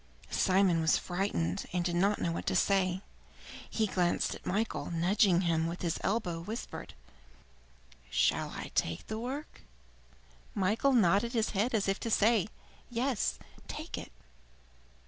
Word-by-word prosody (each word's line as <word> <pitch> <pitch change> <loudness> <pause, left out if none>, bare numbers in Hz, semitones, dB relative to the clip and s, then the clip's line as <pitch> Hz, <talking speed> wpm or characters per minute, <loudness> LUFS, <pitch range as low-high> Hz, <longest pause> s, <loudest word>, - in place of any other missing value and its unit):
Simon 185 -3 +3
was 160 - +4
frightened, 175 - -2
and 175 -1 -1
did 175 -1 0
not 200 +4 +2
know 170 - 0
what 165 - -4
to - - +1
say. 190 -1 +2 0.7
He 220 - +1
glanced 180 -3 +1
at - - -10
Michael 215 +4 -1
and 165 - -3
nudging 185 0 +4
him 165 -2 +1
with 170 +2 -5
his 170 -1 -1
elbow, 190 -5 -1
whispered: 210 - -6 1.1
"Shall 65 -1 +2
I - - -7
take 85 0 0
the 220 0 -4
work?" 265 +6 -6 0.9
Michael 215 +8 +2
nodded 215 +1 +3
his 225 -2 +1
head 220 +4 +1
as 205 -2 +1
if 195 0 0
to 230 - -3
say, 220 -1 +3 0.4
"Yes, 245 -1 0 0.3
take - - -5
it." - - -7
195 Hz, 145 wpm, -31 LUFS, 175-220 Hz, 1.1 s, was